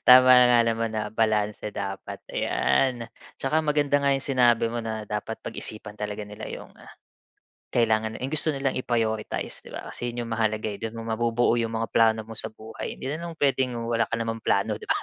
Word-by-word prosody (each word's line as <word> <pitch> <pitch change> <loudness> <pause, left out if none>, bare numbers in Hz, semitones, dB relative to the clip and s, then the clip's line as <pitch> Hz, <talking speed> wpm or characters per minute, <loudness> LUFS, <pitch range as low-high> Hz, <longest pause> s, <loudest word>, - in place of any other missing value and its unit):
Tama 130 0 +9
nga 125 -1 +7
naman 115 -1 0
na 110 -1 -2
balanse 105 -1 0
dapat, 95 -1 -5
ayan. 120 - +1 0.3
Tsaka 155 +4 +1
maganda 145 -1 +2
nga 140 -1 +2
‘yong 135 +1 -1
sinabi 120 -4 +4
mo 115 0 -4
na 110 -2 -4
dapat 105 +1 -4
pag-isipan 105 -1 -5
talaga 105 0 -4
nila 105 0 -7
‘yong - - -9 0.9
kailangan, 110 -2 +1
‘yong 135 +4 -4
gusto 155 +1 +1
nilang 135 -2 0
i-prioritize, 115 -3 -1
‘di - - -14
ba? - - -7
Kasi 120 - -3
‘yon 120 0 -4
‘yong 115 - -4
mahalaga, 110 -1 0
eh. 105 -1 -4
Do’n 115 0 -4
mo 115 - -6
mabubuo 120 +1 +2
‘yong 115 -1 0
mga 115 0 -3
plano 110 -1 +4
mo 115 - -8
sa 110 0 -2
buhay. 110 +1 -7
Hindi - - -8
naman 165 +1 -6
puwedeng 130 -3 +1
wala 115 -1 +1
ka 115 - -1
namang 115 0 -3
plano, 105 0 +1
‘di - - -11
ba? - - +3
115 Hz, 195 wpm, -26 LUFS, 110-125 Hz, 0.9 s, Tama